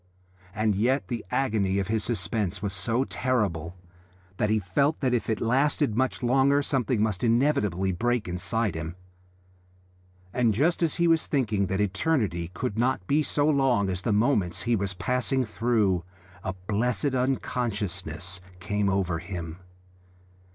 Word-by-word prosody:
And 110 Hz, 0 st, +2 dB
yet 125 Hz, +8 st, +1 dB
the 120 Hz, -3 st, -3 dB
agony 105 Hz, -7 st, +1 dB
of 100 Hz, -, -1 dB
this 110 Hz, 0 st, 0 dB
suspense 105 Hz, -2 st, -1 dB
was 100 Hz, -1 st, -3 dB
so 115 Hz, +7 st, +1 dB
terrible 100 Hz, -, -1 dB, 0.6 s
that 105 Hz, -, +1 dB
he 110 Hz, -, +3 dB
felt 125 Hz, -, +1 dB
that 130 Hz, -3 st, +1 dB
if 120 Hz, -, 0 dB
it 110 Hz, -, 0 dB
lasted 135 Hz, +1 st, +1 dB
much 130 Hz, +1 st, 0 dB
longer 135 Hz, +3 st, +3 dB
something 125 Hz, -6 st, +1 dB
must 105 Hz, -2 st, -1 dB
inevitably 115 Hz, -, +2 dB
break 120 Hz, +4 st, 0 dB
inside 100 Hz, +4 st, -1 dB
him... 80 Hz, +1 st, -5 dB, 1.4 s
and 115 Hz, -4 st, +2 dB
just 160 Hz, -, +2 dB
as 165 Hz, -3 st, +2 dB
he 170 Hz, -1 st, +2 dB
was 165 Hz, -1 st, +3 dB
thinking 110 Hz, -8 st, +1 dB
that 95 Hz, +2 st, -1 dB
eternity 100 Hz, -, 0 dB
could 115 Hz, -4 st, -3 dB
not 120 Hz, -6 st, +1 dB
be 145 Hz, +10 st, +2 dB
so 145 Hz, 0 st, +1 dB
long 135 Hz, -9 st, +2 dB
as 90 Hz, 0 st, -3 dB
the 115 Hz, -, -1 dB
moments 105 Hz, -5 st, +1 dB
he 120 Hz, -1 st, +2 dB
was 100 Hz, -2 st, -2 dB
passing 125 Hz, +5 st, 0 dB
through, 110 Hz, -5 st, +1 dB, 0.4 s
a 95 Hz, -, -2 dB
blessed 125 Hz, +7 st, 0 dB
unconsciousness 100 Hz, -, -2 dB, 0.2 s
came 105 Hz, +1 st, 0 dB
over 95 Hz, -3 st, 0 dB
him. 85 Hz, -2 st, -6 dB
110 Hz, 150 wpm, -27 LUFS, 95-130 Hz, 1.4 s, he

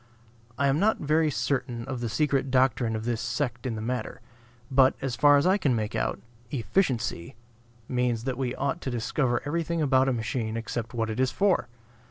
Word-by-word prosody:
I 140 Hz, -, +1 dB
am 140 Hz, +2 st, +2 dB
not 215 Hz, +3 st, +3 dB
very 155 Hz, +1 st, +2 dB
certain 125 Hz, -4 st, -2 dB
of 130 Hz, -2 st, -4 dB
the 120 Hz, -1 st, -2 dB
secret 140 Hz, +1 st, +1 dB
doctrine 125 Hz, -3 st, +2 dB
of 110 Hz, 0 st, -4 dB
this 120 Hz, -1 st, -1 dB
sect 125 Hz, 0 st, -2 dB
in 115 Hz, -, -2 dB
the 110 Hz, -, -5 dB
matter. 125 Hz, +2 st, -3 dB, 0.5 s
But, 130 Hz, 0 st, +5 dB
as 135 Hz, -3 st, -2 dB
far 145 Hz, +3 st, +6 dB
as 140 Hz, -, +2 dB
I 190 Hz, +3 st, +4 dB
can 140 Hz, -9 st, +2 dB
make 110 Hz, -1 st, -2 dB
out, -, -, -1 dB, 0.3 s
"efficiency" 120 Hz, -, -1 dB, 0.5 s
means 125 Hz, -3 st, 0 dB
that 130 Hz, 0 st, -2 dB
we 125 Hz, -1 st, -2 dB
ought 140 Hz, +5 st, -2 dB
to -, -, -3 dB
discover 120 Hz, +1 st, 0 dB
everything 165 Hz, +2 st, -1 dB
about 135 Hz, -3 st, +3 dB
a -, -, +1 dB
machine 115 Hz, -1 st, -2 dB
except 115 Hz, +1 st, -4 dB
what 115 Hz, -1 st, -1 dB
it 110 Hz, -, -4 dB
is 130 Hz, 0 st, +3 dB
for. 195 Hz, +3 st, +1 dB
130 Hz, 195 wpm, -27 LUFS, 115-140 Hz, 0.5 s, far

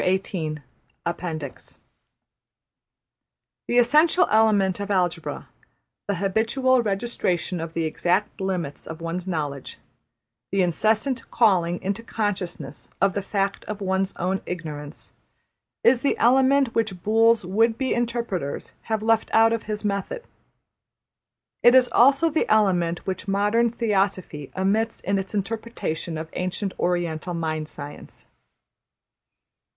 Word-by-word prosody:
\chapter{Appendix} 160 Hz, -3 st, -4 dB, 1.9 s
The 240 Hz, -, +1 dB
essential 305 Hz, +9 st, +5 dB
element 205 Hz, -3 st, +3 dB
of 200 Hz, 0 st, -4 dB
Algebra: 180 Hz, -4 st, -1 dB, 0.6 s
the 200 Hz, -, 0 dB
habitual 225 Hz, +7 st, +2 dB
registration 195 Hz, -5 st, -1 dB
of 165 Hz, 0 st, -5 dB
the 165 Hz, -, -1 dB
exact 180 Hz, +6 st, 0 dB
limits 180 Hz, -7 st, -3 dB
of 160 Hz, 0 st, -7 dB
one's 170 Hz, +2 st, -4 dB
knowledge, 145 Hz, -6 st, -4 dB, 0.7 s
the 195 Hz, -1 st, +2 dB
incessant 220 Hz, -, +1 dB
calling 180 Hz, -7 st, +2 dB
into 200 Hz, +4 st, -2 dB
consciousness 185 Hz, -10 st, -4 dB
of 195 Hz, 0 st, +3 dB
the 200 Hz, -, -1 dB
fact 195 Hz, 0 st, -2 dB
of 210 Hz, -1 st, -5 dB
one's 190 Hz, 0 st, -1 dB
own 190 Hz, +2 st, -1 dB
ignorance, 155 Hz, -4 st, -6 dB, 0.7 s
is 245 Hz, 0 st, +5 dB
the 280 Hz, -, 0 dB
element 265 Hz, +1 st, +4 dB
which 215 Hz, -6 st, -1 dB
Boole's 225 Hz, 0 st, +4 dB
would 225 Hz, +5 st, +2 dB
be 265 Hz, 0 st, 0 dB
interpreters 230 Hz, -11 st, -3 dB, 0.2 s
have 220 Hz, -1 st, 0 dB
left 225 Hz, 0 st, +2 dB
out 225 Hz, +1 st, +6 dB
of 230 Hz, -, -2 dB
his 210 Hz, 0 st, -3 dB
method. 205 Hz, -, -2 dB, 1.4 s
It 240 Hz, +1 st, +7 dB
is 255 Hz, -1 st, +6 dB
also 275 Hz, +6 st, +5 dB
the 315 Hz, -, 0 dB
element 180 Hz, -5 st, +2 dB
which 190 Hz, +1 st, -4 dB
modern 210 Hz, +4 st, +2 dB
Theosophy 195 Hz, -, -1 dB
omits 215 Hz, +4 st, 0 dB
in 195 Hz, +1 st, 0 dB
its 190 Hz, +2 st, -5 dB
interpretation 200 Hz, -6 st, -3 dB
of 160 Hz, +1 st, -5 dB
ancient 185 Hz, +2 st, -3 dB
Oriental 175 Hz, -1 st, -1 dB
Mind 155 Hz, -2 st, -3 dB
Science. 145 Hz, 0 st, -10 dB
195 Hz, 120 wpm, -24 LUFS, 175-225 Hz, 1.9 s, It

